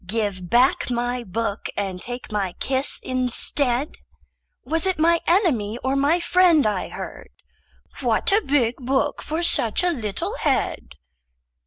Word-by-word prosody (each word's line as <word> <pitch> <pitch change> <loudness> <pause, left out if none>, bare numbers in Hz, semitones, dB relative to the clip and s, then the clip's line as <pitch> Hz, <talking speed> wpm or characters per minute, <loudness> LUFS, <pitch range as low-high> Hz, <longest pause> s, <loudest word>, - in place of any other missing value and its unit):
Give 195 -4 -2
back 250 +5 +3
my 245 0 -1
book 205 +1 -3
and 190 -3 -3
take 245 -1 -7
my 195 -4 -1
kiss 265 +6 0
instead. 255 +1 0 0.7
Was 325 +6 0
it 375 - 0
my 335 +1 +3
enemy 260 - +2
or 265 +1 0
my 285 +5 +2
friend 345 -3 +4
I 210 -3 -1
heard?— - - -8 0.7
"What - - +1
a 410 +3 +4
big 260 - +1
book 265 +1 -1
for 320 +3 -3
such 235 -5 +1
a 355 - +2
little 215 - -4
head!" - - -1
255 Hz, 140 wpm, -23 LUFS, 220-315 Hz, 0.7 s, friend